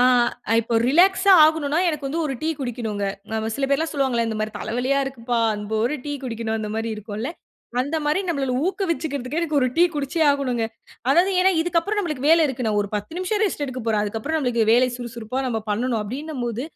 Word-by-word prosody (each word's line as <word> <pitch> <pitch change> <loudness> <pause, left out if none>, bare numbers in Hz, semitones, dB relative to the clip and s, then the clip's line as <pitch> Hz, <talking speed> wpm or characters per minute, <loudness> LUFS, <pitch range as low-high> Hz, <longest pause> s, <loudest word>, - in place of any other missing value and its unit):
ஆ - - +6 0.6
இப்போ 230 +1 -3
ரிலாக்ஸ்ஸா 380 +6 +5
ஆகணுன்னா 310 0 +2
எனக்கு 300 -4 -2
வந்து 315 +5 -2
ஒரு 270 - -3
டீ 315 - -1
குடிக்கணுங்க. 230 -6 -3 0.3
ஆமா 220 0 -2
சில 275 - 0
பேர்ல்லாம் 315 +4 0
சொல்வாங்கல்ல, 260 -5 +1
இந்த 220 - -3
மாரி 215 - -1
தலைவலியா 245 +5 0
இருக்குப்பா! 245 -3 -2
அன் 210 0 -5 0.2
ஒரு 245 +6 +1
டீ 290 - -2
குடிக்கணும் 225 -2 -3
அந்தமாரி 220 +1 -3
இருக்கும்ல. 215 +6 -5 0.5
அந்த 285 +5 -1
மாரி 300 +5 +2
நம்மள 275 -6 -1
ஊக்குவிச்சுக்குறதுக்கே 315 -7 -2
எனக்கு 310 -3 -1
ஒரு 255 - +3
டீ 340 - +5
குடிச்சே 290 +3 -2
ஆகணுங்க. 255 -5 0 0.4
அதாவது 350 +8 +4
ஏன்னா 380 - +5
இதுக்கு 340 0 +1
அப்புறம் 415 +4 -2
நமக்கு 305 -7 -3
வேலை 325 +1 +6
இருக்கு. 260 -2 -3
நான் 210 -1 +1
ஒரு 205 - -6
10 260 +11 -6
நிமிஷம் 405 +3 -1
ரெஸ்ட் 335 -7 -1
எடுக்க 260 -2 -5
போறேன். 215 -2 +2
அதுக்கப்புறம் 225 +10 -2
நமக்கு 240 -4 +1
வேலை 250 +2 +5
சுறுசுறுப்பா 235 +1 -5
நம்ம 230 -3 -1
பண்ணணும் 230 +2 0
அப்பிடீன்னம்போது, 250 -1 -4
265 Hz, 190 wpm, -23 LUFS, 230-315 Hz, 0.6 s, ஆ